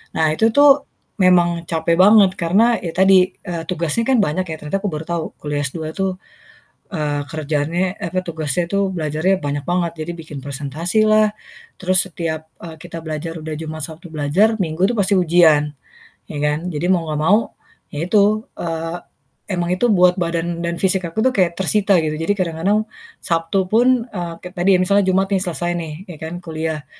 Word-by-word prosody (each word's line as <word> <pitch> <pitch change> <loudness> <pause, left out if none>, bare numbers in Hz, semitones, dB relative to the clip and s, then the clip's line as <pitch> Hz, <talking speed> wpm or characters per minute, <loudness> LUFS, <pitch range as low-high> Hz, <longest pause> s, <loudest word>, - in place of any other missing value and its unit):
Nah, 160 -1 +2
itu 220 +8 +2
tuh 285 -1 +6 0.3
memang 175 -2 +3
capek 165 +1 0
banget 200 -1 +7
karena 215 +8 +3
ya 165 -2 -6
tadi, 190 0 +4
eee, 170 -2 -4
tugasnya 175 +5 -1
kan 265 -2 +3
banyak 185 +3 -1
ya, 160 - -4
ternyata 155 +6 -3
aku 205 - -3
baru 155 -3 -4
tahu 170 -1 -3 0.2
kuliah 145 -1 -2
S2 155 +2 -5
itu, 195 +3 -1 0.8
eee, 150 -5 -2
kerjany 160 +4 -1
eh, 175 - -3
apa, 185 - -1
tugasnya 160 0 -2
tuh 200 +2 0
belajarnya 165 +2 0
banyak 145 0 -2
banget. 175 -2 0
Jadi 170 +2 -4
bikin 150 -4 -9
presentasi 145 +9 -1
lah, 215 0 +4 0.5
terus 185 0 +3
setiap, 160 -2 -4 0.2
eee, 160 -1 -10
kita 165 - -8
belajar 160 +1 -5
udah 155 0 -6
Jumat, 155 -1 -4
Sabtu 165 +2 -11
belajar, 165 +9 +1
Minggu 180 +2 0
tuh 240 - -2
pasti 200 0 +2
ujian, 165 -5 +4 0.6
ya 150 - -5
kan. 150 +4 -1
Jadi 160 +3 -2
mau 180 -3 +2
nggak 150 - -2
mau 210 +3 +6 0.5
ya 150 +3 -4
itu, 210 +2 +2
eee, 165 0 -3 0.5
emang 175 -2 -1
itu 240 +6 +1
buat 180 -3 +5
badan 170 0 -2
dan 170 0 -2
fisik 190 0 +2
aku 220 +8 -1
tuh 260 - +3
kayak 175 -4 +1
tersita 195 0 +3
gitu. 155 -1 -2
Jadi 205 +5 +1
kadang-kadang 185 +5 0 0.4
Sabtu 165 +3 0
pun 245 +1 +3
eee, 175 -3 -5
kayak 180 0 -9
tadi 180 +3 +1
ya - - -3
misalnya 200 +1 +3
Jumat 190 +1 +2
nih 190 - +2
selesai 175 -1 -2
nih, 160 -3 -5 0.2
ya 155 - -10
kan 160 +2 -5
kuliah, 160 -3 -4
175 Hz, 185 wpm, -19 LUFS, 160-190 Hz, 0.8 s, banget